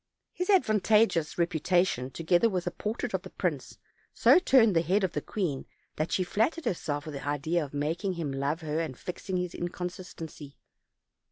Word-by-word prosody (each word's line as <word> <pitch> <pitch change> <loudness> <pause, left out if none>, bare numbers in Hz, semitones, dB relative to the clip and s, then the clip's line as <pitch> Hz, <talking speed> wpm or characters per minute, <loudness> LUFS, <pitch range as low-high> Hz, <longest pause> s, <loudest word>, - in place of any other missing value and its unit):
His 360 +2 -3
advantageous 215 - +3
reputation, 170 -5 +1
together 175 - +2
with 180 -4 -2
a - - -1
portrait 220 +2 -4
of 190 - 0
the 185 - -10
prince, 155 -10 -3 0.4
so - - +6
turned 240 - +5
the 165 - +5
head 190 +4 +1
of 190 - +1
the - - -2
queen 170 -10 -3 0.3
that 155 +2 -1
she 185 - +2
flattered 225 - 0
herself 145 -4 -2
with 155 - -6
the 140 0 -6
idea 155 +4 0
of 140 - -8
making 160 +7 -1
him 165 -5 -3
love 140 +4 -1
her 155 0 -2
and 155 -7 -3
fixing 185 +1 -4
his 180 -1 -2
inconstancy. 175 -4 -6
175 Hz, 175 wpm, -29 LUFS, 150-195 Hz, 0.4 s, so